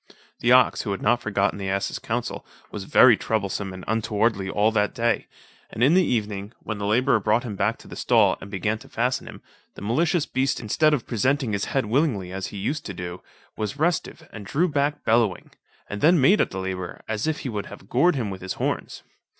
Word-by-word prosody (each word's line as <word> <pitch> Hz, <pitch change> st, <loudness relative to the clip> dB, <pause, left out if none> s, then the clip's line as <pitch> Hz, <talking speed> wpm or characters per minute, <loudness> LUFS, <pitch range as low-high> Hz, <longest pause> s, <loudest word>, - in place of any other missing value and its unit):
The 120 Hz, -, +2 dB
ox, 130 Hz, 0 st, +5 dB
who 105 Hz, -, -5 dB
had 95 Hz, -, -6 dB
not 120 Hz, 0 st, +3 dB
forgotten 100 Hz, -1 st, 0 dB
the 95 Hz, -1 st, -3 dB
ass's 95 Hz, 0 st, -2 dB
counsel, -, -, -3 dB, 0.3 s
was -, -, -6 dB
very -, -, +7 dB
troublesome 100 Hz, -2 st, -2 dB
and 95 Hz, 0 st, -9 dB
untowardly 110 Hz, -2 st, 0 dB
all 105 Hz, +3 st, +2 dB
that 105 Hz, +1 st, 0 dB
day, 115 Hz, -1 st, 0 dB, 0.4 s
and 115 Hz, -, -2 dB
in 140 Hz, +6 st, +5 dB
the 185 Hz, +1 st, +5 dB
evening, 105 Hz, -, -2 dB
when 110 Hz, -2 st, -5 dB
the 100 Hz, -, -2 dB
labourer 120 Hz, +2 st, +3 dB
brought 110 Hz, +4 st, +1 dB
him 110 Hz, -5 st, -5 dB
back -, -, 0 dB
to -, -, -16 dB
the -, -, -9 dB
stall, -, -, +3 dB
and 100 Hz, -, -9 dB
began 105 Hz, +2 st, -2 dB
to -, -, -15 dB
fasten 125 Hz, +2 st, -1 dB
him, -, -, -11 dB, 0.3 s
the -, -, -9 dB
malicious 155 Hz, -, +1 dB
beast 135 Hz, +2 st, 0 dB
instead 155 Hz, +8 st, +2 dB
of 125 Hz, -, -5 dB
presenting 130 Hz, +2 st, 0 dB
his 100 Hz, -, -1 dB
head 135 Hz, -3 st, -1 dB
willingly 110 Hz, -, 0 dB
as 95 Hz, 0 st, -4 dB
he 105 Hz, -, -8 dB
used 145 Hz, +10 st, -2 dB
to 100 Hz, -, -6 dB
do, 90 Hz, 0 st, -6 dB, 0.3 s
was 105 Hz, +4 st, -4 dB
restive, 160 Hz, 0 st, -1 dB
and 105 Hz, -3 st, -8 dB
drew 170 Hz, -, +1 dB
back 145 Hz, -1 st, -1 dB
bellowing; 110 Hz, -4 st, +1 dB, 0.4 s
and 100 Hz, -, -6 dB
then 170 Hz, +2 st, +5 dB
made 170 Hz, +11 st, +5 dB
at -, -, +1 dB
the 95 Hz, -, -7 dB
labourer, 95 Hz, -1 st, -5 dB
as 110 Hz, +4 st, -2 dB
if 160 Hz, -1 st, -1 dB
he 130 Hz, -, -4 dB
would 105 Hz, -3 st, -4 dB
have 95 Hz, -, -12 dB
gored 170 Hz, +10 st, +3 dB
him 115 Hz, -7 st, -2 dB
with 95 Hz, -, -7 dB
his 95 Hz, 0 st, -4 dB
horns. -, -, -3 dB
110 Hz, 220 wpm, -24 LUFS, 100-135 Hz, 0.4 s, very